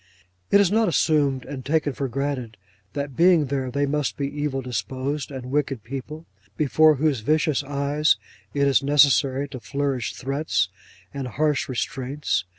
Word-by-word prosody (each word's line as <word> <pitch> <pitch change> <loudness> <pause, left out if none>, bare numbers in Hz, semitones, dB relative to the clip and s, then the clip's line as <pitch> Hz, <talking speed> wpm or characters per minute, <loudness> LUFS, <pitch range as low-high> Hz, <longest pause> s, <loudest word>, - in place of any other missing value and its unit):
It 200 - +6
is 200 -2 +3
not 225 +1 +3
assumed 145 -6 +2
and 135 -1 -7
taken 145 0 0
for 135 +1 -3
granted 130 -3 -3 0.4
that 140 -2 -4
being 170 -1 +5
there 135 -1 -2
they 140 +3 0
must 145 0 -1
be 140 - -1
evil 145 -2 -3
disposed 130 +3 -3
and 130 -2 -7
wicked 140 -5 -1
people, 140 +5 -7 0.3
before 155 +1 +4
whose 145 -2 +1
vicious 150 +4 +1
eyes 140 +2 +1 0.3
it 140 -1 +1
is 135 -2 +4
necessary 140 -1 +3
to 135 -3 -7
flourish 135 -2 -2
threats 135 - -1 0.4
and 135 -2 -4
harsh 145 +3 0
restraints. 130 - -2
140 Hz, 155 wpm, -24 LUFS, 130-150 Hz, 0.4 s, It